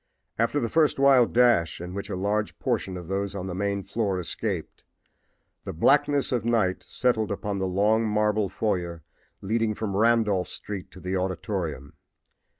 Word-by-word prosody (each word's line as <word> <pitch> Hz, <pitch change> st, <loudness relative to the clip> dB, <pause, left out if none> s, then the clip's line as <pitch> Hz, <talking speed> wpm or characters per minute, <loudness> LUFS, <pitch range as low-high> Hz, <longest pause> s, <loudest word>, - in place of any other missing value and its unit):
After 115 Hz, +5 st, +2 dB
the 115 Hz, -, -1 dB
first 155 Hz, +4 st, +2 dB
wild 135 Hz, -3 st, +5 dB
dash, 120 Hz, -9 st, +3 dB
in 90 Hz, +1 st, -7 dB
which 100 Hz, +1 st, -5 dB
a -, -, -3 dB
large 105 Hz, +3 st, -1 dB
portion 95 Hz, -1 st, -2 dB
of 90 Hz, -2 st, -8 dB
those 100 Hz, +1 st, -2 dB
on 95 Hz, -2 st, -4 dB
the 95 Hz, -, -4 dB
main 100 Hz, +1 st, -1 dB
floor 100 Hz, -4 st, -1 dB
escaped, 90 Hz, 0 st, -4 dB, 0.8 s
the -, -, -5 dB
blackness 140 Hz, -, +3 dB
of 120 Hz, -4 st, 0 dB
night 110 Hz, -6 st, +1 dB
settled 115 Hz, -4 st, 0 dB
upon 100 Hz, 0 st, -3 dB
the 95 Hz, -, 0 dB
long 105 Hz, +4 st, +2 dB
marble 105 Hz, -1 st, +1 dB
foyer 85 Hz, -7 st, -2 dB, 0.4 s
leading 110 Hz, +1 st, 0 dB
from 100 Hz, -3 st, -3 dB
Randolph 105 Hz, -4 st, +2 dB
street 100 Hz, -3 st, -6 dB
to -, -, -13 dB
the 90 Hz, +1 st, -3 dB
auditorium. 90 Hz, -6 st, -3 dB
100 Hz, 160 wpm, -26 LUFS, 95-115 Hz, 0.8 s, wild